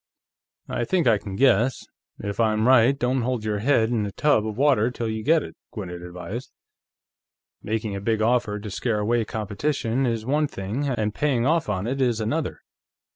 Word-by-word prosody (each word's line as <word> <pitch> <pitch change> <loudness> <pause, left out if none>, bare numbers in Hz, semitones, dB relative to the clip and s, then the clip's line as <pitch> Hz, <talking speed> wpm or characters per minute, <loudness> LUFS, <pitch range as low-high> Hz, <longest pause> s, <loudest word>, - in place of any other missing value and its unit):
"I 120 - -2
think 175 +5 +1
I 110 -4 +4
can 100 -2 -7
guess. 125 0 +3 0.3
If 100 +1 -5
I'm 110 0 +2
right, 130 +1 +5
don't 125 0 0
hold 120 -2 -2
your 105 -1 -1
head 115 -1 +2
in 115 -3 +1
a - - -6
tub 110 -3 +2
of 110 -1 -5
water 130 -5 +3
till 120 -2 -4
you 110 0 -3
get 160 +3 +3
it," - - -10 0.2
Gwinnett 90 -5 -6
advised. 90 +7 -7 1.1
"Making 110 -1 -2
a 100 - -4
big 110 +1 0
offer 110 -2 +1
to 105 0 -7
scare 110 +2 -1
away 115 +2 +1
competition 115 +4 -1
is 115 -2 -2
one 150 +4 +1
thing, 110 +7 -3
and 110 -6 -1
paying 130 -4 +1
off 160 -3 +1
on 95 -1 -1
it 135 +3 -2
is 120 -3 +2
another. 145 +9 -2
115 Hz, 185 wpm, -24 LUFS, 105-130 Hz, 1.1 s, right